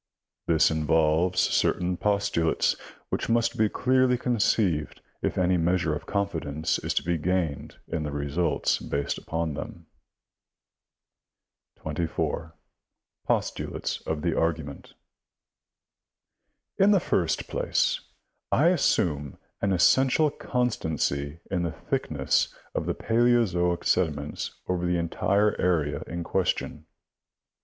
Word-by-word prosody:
This 80 -2 +4
involves 80 +3 +2
certain 90 0 +1
postulates 100 -4 +1 0.3
which - - -2
must 115 0 +2
be 110 -1 +2
clearly 130 +1 +2
conceived 105 - +1 0.2
if - - -1
any 90 0 +3
measure 85 -1 +1
of 75 - -6
confidence 80 -6 -1
is - - -3
to - - +1
be 85 -1 0
gained 85 -3 -1
in 80 - -2
the 75 - -3
results 75 +4 0
based 70 0 -2
upon 80 -1 -3
them. - - -7 1.9
24. 80 +1 -3 0.7
Post - - 0
dates - - -4
of 80 -1 -2
the 85 -2 +1
argument. 80 -4 -2 0.9
— - - -57
In 200 - +6
the 200 -2 +5
first 85 - 0
place, - - 0 0.5
I 155 +5 +5
assume 80 - +1 0.2
an 100 - +1
essential 130 - +4
constancy 80 - -2
in 90 -2 0
the 85 -2 -2
thickness - - 0 0.2
of - - -2
the - - -1
paleozoic 115 -7 +2
sediments 75 -5 -1
over 90 -1 -1
the 90 0 +1
entire 100 +5 +1
area 75 -5 +1
in 85 +1 -4
question. 95 +1 -2
85 Hz, 115 wpm, -26 LUFS, 80-100 Hz, 1.9 s, In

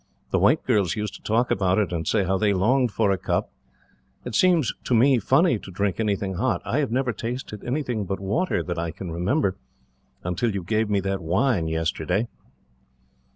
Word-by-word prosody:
The - - +2
white - - +3
girls 105 -8 +1
used 105 -2 -3
to - - -11
talk 115 +3 +1
about 95 -1 +2
it, 100 -4 0
and 80 -2 -3
say 105 -3 +2
how 95 +1 0
they 105 -2 +2
longed 120 +6 +2
for 105 -1 +1
a 95 - 0
cup. - - -1 0.7
It 125 - -5
seems, 165 - +3
to 125 - +2
me, 130 +2 +5
funny 165 - +3
to - - -11
drink 100 +1 -1
anything 100 -3 -1
hot. 110 -4 +1
I 135 - 0
have 140 - 0
never 125 +1 0
tasted 115 -3 -5
anything 125 -5 -2
but 95 +1 -3
water, 130 - 0
that 85 -2 -4
I 85 0 -2
can 85 +2 -7
remember, 95 - 0 0.7
until 100 +5 -1
you 95 - -3
gave 110 +4 0
me 100 -1 +1
that 95 0 -2
wine 90 +2 +1
yesterday." 80 +6 -1
105 Hz, 195 wpm, -24 LUFS, 95-120 Hz, 0.7 s, me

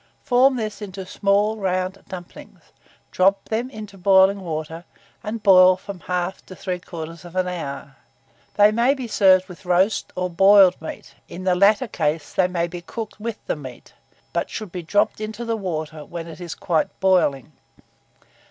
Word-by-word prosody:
Form 260 +2 +4
this 215 -3 -4
into 195 -2 -7
small 205 +3 +1
round 185 -1 -2
dumplings; 180 -2 -10 0.5
drop 195 +1 +2
them 230 +3 -1
into 210 -5 -10
boiling 190 +1 +5
water, 160 -1 -5 0.4
and 220 0 -5
boil 185 -2 +7
from 190 0 -9
1/2 180 +1 -2
to 185 - -10
3/4 175 -1 -5
hour. 140 -6 -6 0.6
They 205 0 +6
may 240 +5 +2
be 260 -3 -6
served 190 -4 +4
with 180 +2 -12
roast 185 +3 +1
or 180 0 -1
boiled 195 +1 +5
meat; 160 - -8 0.2
in 185 - -8
the 185 -1 +2
latter 205 +7 +4
case 150 -6 -2
they 185 - +3
may 175 -2 -1
be 175 0 -7
cooked 215 +3 -7
with 225 0 -4
the - - -1
meat, 130 -5 -11 0.4
but - - -1
should 215 -5 -6
be 180 - -5
dropped 205 +5 0
into 220 +2 -5
the 230 0 -1
water 160 -6 -5
when 170 +2 -7
it 165 +2 -10
is 170 -2 -6
quite 165 -3 -1
boiling. 175 -7 +2
185 Hz, 160 wpm, -22 LUFS, 175-205 Hz, 0.6 s, boil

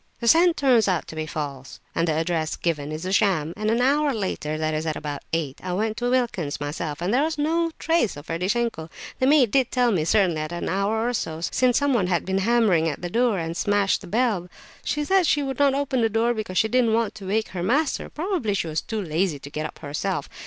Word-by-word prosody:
The 235 - -3
scent 335 +5 +5
turns 250 -6 +4
out 180 -4 0
to - - -8
be 155 0 -3
false, 140 -4 -6
and 165 +1 0
the 160 - +2
address 160 0 -1
given 150 -4 -2
is 155 +3 -5
a 185 - -2
sham. 175 -6 +2
An 215 0 -1
hour 285 +4 +3
after—that 155 - -2
is 155 +1 -2
at 155 - -1
about 145 -1 -5
eight, 155 -5 -2
I 180 -1 -3
went 215 +3 -1
to 245 0 -1
Wilkin's 220 - -1
myself, 145 +2 -4
and 190 +5 0
there 260 - +3
was 310 0 -1
no 330 +3 +1
trace 325 - +1
of 145 - -10
Ferdishenko. 180 0 -2 0.3
The 260 - +2
maid 275 -6 +5
did 265 -3 +2
tell 245 -2 +2
me, 175 -7 +1
certainly, 180 -1 +2
that 155 +1 -5
an 175 - -3
hour 215 +4 0
or 245 - -1
so 160 -8 -3
since 245 +7 +2
someone 260 -10 +2
had 175 -2 0
been 190 +1 0
hammering 195 -7 +3
at 150 - -6
the 175 - -4
door, 235 -2 +2
and 165 -2 -3
had 165 - -5
smashed 205 +1 +1
the 195 - -10
bell; 210 -4 0 0.3
she 295 - -1
said 380 0 +3
she 295 -1 +2
would 270 -1 -4
not 280 -1 +4
open 275 -3 0
the 225 - +3
door 225 +2 +1
because 215 -5 -4
she 220 - +4
didn't 235 -1 +2
want 230 -1 +1
to 195 -3 -9
wake 215 +3 0
her 180 - -5
master; 275 - 0
probably 320 - -2
she 190 - -1
was 155 -1 -2
too 220 -2 -4
lazy 165 -1 0
to 140 +1 -11
get 155 +1 -3
up - - -14
herself. 145 -1 -3
200 Hz, 240 wpm, -24 LUFS, 165-245 Hz, 0.3 s, scent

